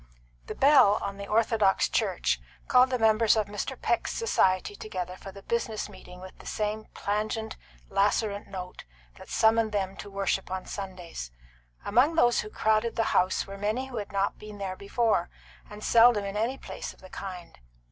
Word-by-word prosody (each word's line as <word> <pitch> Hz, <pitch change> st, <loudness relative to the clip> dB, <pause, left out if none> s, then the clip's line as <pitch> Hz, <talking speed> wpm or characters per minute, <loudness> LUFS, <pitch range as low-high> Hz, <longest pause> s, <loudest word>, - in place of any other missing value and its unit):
XXV. -, -, -30 dB
The -, -, -5 dB
bell 265 Hz, -8 st, +6 dB
on 200 Hz, 0 st, -4 dB
the 200 Hz, 0 st, -7 dB
orthodox 215 Hz, -2 st, +3 dB
church -, -, 0 dB, 0.3 s
called 255 Hz, 0 st, +5 dB
the 255 Hz, -, 0 dB
members 220 Hz, -1 st, +4 dB
of 215 Hz, -, +2 dB
Mr. 205 Hz, +1 st, -5 dB
Peck's -, -, 0 dB
society 190 Hz, -, +1 dB
together 185 Hz, -4 st, -5 dB
for 195 Hz, -, -10 dB
the 195 Hz, +1 st, -13 dB
business 230 Hz, -2 st, -2 dB
meeting 180 Hz, -2 st, -12 dB
with 185 Hz, 0 st, -10 dB
the -, -, -12 dB
same 215 Hz, 0 st, -2 dB
plangent, 215 Hz, +2 st, -2 dB, 0.3 s
lacerant 200 Hz, +1 st, 0 dB
note 180 Hz, -2 st, -7 dB, 0.4 s
that -, -, -12 dB
summoned 220 Hz, -1 st, +3 dB
them 195 Hz, -1 st, -1 dB
to 205 Hz, -, -8 dB
worship 195 Hz, -1 st, -1 dB
on 185 Hz, 0 st, -4 dB
Sundays. 185 Hz, -, -7 dB, 0.6 s
Among 285 Hz, +7 st, +3 dB
those 240 Hz, -7 st, +4 dB
who 210 Hz, -, -3 dB
crowded 220 Hz, +2 st, +1 dB
the 225 Hz, -, +2 dB
house 185 Hz, +1 st, +2 dB
were 195 Hz, 0 st, -9 dB
many 220 Hz, +6 st, -1 dB
who 245 Hz, -, -6 dB
had 205 Hz, -2 st, -5 dB
not 200 Hz, 0 st, -1 dB
been 210 Hz, -1 st, -10 dB
there 195 Hz, -2 st, -4 dB
before, 200 Hz, -2 st, 0 dB, 0.4 s
and 210 Hz, +1 st, -10 dB
seldom 230 Hz, -3 st, +5 dB
in 200 Hz, 0 st, -5 dB
any 230 Hz, +5 st, 0 dB
place -, -, -7 dB
of -, -, -24 dB
the 185 Hz, -, -13 dB
kind. 180 Hz, -, -8 dB
205 Hz, 180 wpm, -28 LUFS, 190-225 Hz, 0.6 s, bell